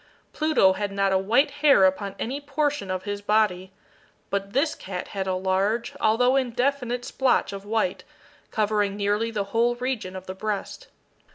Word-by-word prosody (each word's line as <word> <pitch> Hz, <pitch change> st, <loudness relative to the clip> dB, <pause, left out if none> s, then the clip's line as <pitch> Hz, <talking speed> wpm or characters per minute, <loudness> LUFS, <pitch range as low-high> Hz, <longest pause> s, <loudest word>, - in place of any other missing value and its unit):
Pluto 305 Hz, -12 st, +3 dB
had 205 Hz, +1 st, -3 dB
not 195 Hz, 0 st, +1 dB
a 190 Hz, -, +4 dB
white 240 Hz, +9 st, +2 dB
hair 280 Hz, -10 st, +6 dB
upon 195 Hz, +1 st, 0 dB
any 270 Hz, +5 st, -3 dB
portion 290 Hz, -7 st, -1 dB
of 185 Hz, 0 st, -2 dB
his 205 Hz, -1 st, -4 dB
body; 205 Hz, -3 st, +1 dB, 0.6 s
but 200 Hz, 0 st, -2 dB
this 285 Hz, +7 st, +1 dB
cat 185 Hz, -1 st, -6 dB
had 195 Hz, -1 st, -3 dB
a 185 Hz, -, 0 dB
large, 190 Hz, +5 st, 0 dB
although 245 Hz, +4 st, +3 dB
indefinite 250 Hz, -1 st, 0 dB
splotch 260 Hz, -6 st, +1 dB
of 195 Hz, 0 st, -7 dB
white, 225 Hz, +5 st, -1 dB, 0.5 s
covering 210 Hz, -2 st, 0 dB
nearly 205 Hz, +2 st, 0 dB
the 215 Hz, -3 st, -2 dB
whole 235 Hz, +1 st, +2 dB
region 245 Hz, -7 st, -3 dB
of 185 Hz, 0 st, -7 dB
the 185 Hz, -, -5 dB
breast. 205 Hz, +1 st, -4 dB
210 Hz, 165 wpm, -25 LUFS, 195-245 Hz, 0.6 s, hair